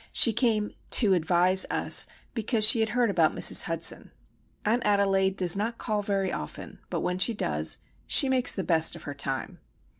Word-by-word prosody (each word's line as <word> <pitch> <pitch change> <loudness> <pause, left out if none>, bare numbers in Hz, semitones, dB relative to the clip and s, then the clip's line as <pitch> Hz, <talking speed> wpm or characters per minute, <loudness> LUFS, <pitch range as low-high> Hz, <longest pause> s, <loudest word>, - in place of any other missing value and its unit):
She 230 - +4
came 220 -2 -1 0.2
"to 210 -5 +2
advise" 180 +2 +1
us, - - +2 0.3
because 225 -1 0
she 230 +1 +6
had 220 0 -1
heard 235 -1 -1
about 165 -4 0
Mrs. - - +5
Hudson. - - -1 0.6
Aunt 230 +4 0
Adelaide 195 -2 0
does 180 -1 +1
not 225 +4 -4
call 215 -2 -4
very 195 -2 -3
often; 75 - -9
but - - -4
when 180 0 -4
she 225 +4 +3
does, - - -2 0.3
she 275 - +6
makes 260 -1 +1
the 190 - -4
best 165 -1 +1
of 170 - -13
her 145 - -8
time. 135 -2 -5
200 Hz, 180 wpm, -25 LUFS, 180-225 Hz, 0.6 s, she